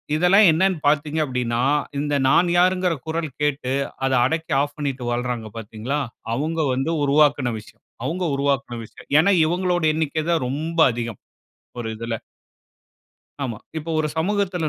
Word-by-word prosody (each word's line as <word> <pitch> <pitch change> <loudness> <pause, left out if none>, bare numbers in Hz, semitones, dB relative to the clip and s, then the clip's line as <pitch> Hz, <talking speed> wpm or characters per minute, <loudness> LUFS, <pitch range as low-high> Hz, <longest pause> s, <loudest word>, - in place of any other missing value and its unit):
இதெல்லாம் 180 +5 +6
என்னன்னு 185 +3 +2
பார்த்தீங்க 150 +1 +2
அப்டீன்னா, 125 -3 -2 0.4
இந்த 145 0 -1
நான் 175 +6 +4
யார்ங்கிற 180 0 +3
குரல் 160 0 -2
கேட்டு 145 -3 0 0.3
அத 135 - +1
அடக்கி 160 +4 -1
ஆஃப் 145 0 -3
பண்ணிட்டு 140 -4 -3
வாழ்றாங்க 120 -2 -2
பார்த்தீங்களா, 115 +6 -4 0.4
அவங்க 160 +5 -2
வந்து 135 +5 -1
உருவாக்குன 145 -3 +3
விஷயம். 105 - -17 0.2
அவங்க 175 +7 -2
உருவாக்குன 140 -3 -1
விஷயம். - - -16
ஏன்னா, 200 +5 +4
இவங்களுடைய 175 -1 +1
எண்ணிக்க 155 0 -1
தான் 160 -6 +1
ரொம்ப 160 +6 -3
அதிகம். 115 -3 -5 0.6
ஒரு 115 -2 -3
இதுல. 115 0 -3 1.3
ஆமா. 115 -5 -4 0.2
இப்போ 160 +2 -6
ஒரு 155 -1 +1
சமூகத்துல, 180 -1 0
150 Hz, 140 wpm, -22 LUFS, 125-165 Hz, 1.3 s, இதெல்லாம்